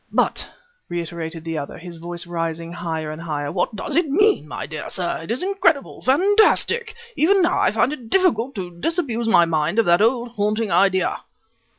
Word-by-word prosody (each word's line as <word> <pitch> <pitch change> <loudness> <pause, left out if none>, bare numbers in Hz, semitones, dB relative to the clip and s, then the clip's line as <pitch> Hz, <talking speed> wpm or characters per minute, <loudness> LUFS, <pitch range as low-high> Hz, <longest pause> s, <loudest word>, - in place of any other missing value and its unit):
"But," - - 0 0.4
reiterated 170 -1 -5
the 165 -1 -3
other, 140 - -7
his 170 -1 -10
voice 175 +1 -5
rising 165 -1 -4
higher 160 -3 -4
and 155 +1 -8
higher, 145 -3 -3
"what 185 +4 -1
does - - -4
it 340 -1 +3
mean, 410 +8 +3
my - - -5
dear - - -6
sir? 180 -2 -2
It 165 - -10
is 240 +8 -1
incredible 365 -7 0
fantastic! 410 - +3 0.2
Even 375 +4 +3
now 350 - +2
I - - +3
find 285 - +1
it 245 -6 -9
difficult 275 - +2
to 175 -3 -7
disabuse 255 - -1
my 175 -6 +5
mind 160 +3 -1
of 230 - +4
that 175 +2 +4
old, 240 +2 +2
haunting 215 -1 -1
idea." 190 -2 +2
200 Hz, 185 wpm, -21 LUFS, -, 0.4 s, my